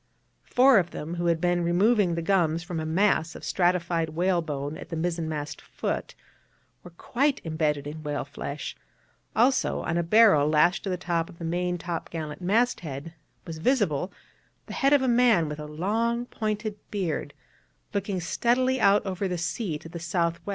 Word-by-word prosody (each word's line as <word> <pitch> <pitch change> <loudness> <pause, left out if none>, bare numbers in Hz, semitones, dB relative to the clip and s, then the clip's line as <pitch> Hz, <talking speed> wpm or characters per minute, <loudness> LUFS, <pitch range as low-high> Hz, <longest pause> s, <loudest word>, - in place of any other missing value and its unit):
Four 255 -3 +6
of 175 -2 -1
them, 160 +1 -6
who 175 0 -1
had 165 -1 +2
been 175 0 +1
removing 185 +1 +3
the 170 - -2
gums 170 -3 +2
from 175 -2 -4
a 155 - -3
mass 165 -1 +2
of - - -10
stratified 175 -2 +1
whalebone 155 -4 -1
at - - -10
the 165 - -4
mizzen 165 0 -2
mast 150 -2 -5
foot, - - -4 0.7
were 180 - -10
quite 265 - 0
imbedded 155 -3 -1
in 150 +2 -6
whale 150 -2 -3
flesh; 140 +1 -6 0.6
also, 255 +4 +2
in 170 0 -1
a - - +2
barrel 170 -5 +5
lashed 155 +4 +3
to - - -2
the 180 - -1
top 170 -2 -1
of - - -14
the 170 - -6
main 180 +1 -1
top 170 -1 -5
gallant 155 -1 -6
masthead 175 - 0 0.3
was 160 -2 -7
visible 185 - +1 0.5
the - - -8
head 275 0 +2
of 285 -2 +5
a - - +1
man 235 -9 +4
with 150 0 -5
a 150 - -6
long 225 +10 -1
pointed 215 -2 -3
beard, 190 -6 -3 0.6
looking 200 -2 -1
steadily 250 +8 +1
out 200 +1 +4
over 190 0 -2
the 180 -1 -2
sea 170 +1 -2
to 155 - -12
the 170 +1 -7
S.W. 170 0 -1
175 Hz, 180 wpm, -26 LUFS, 160-205 Hz, 0.7 s, Four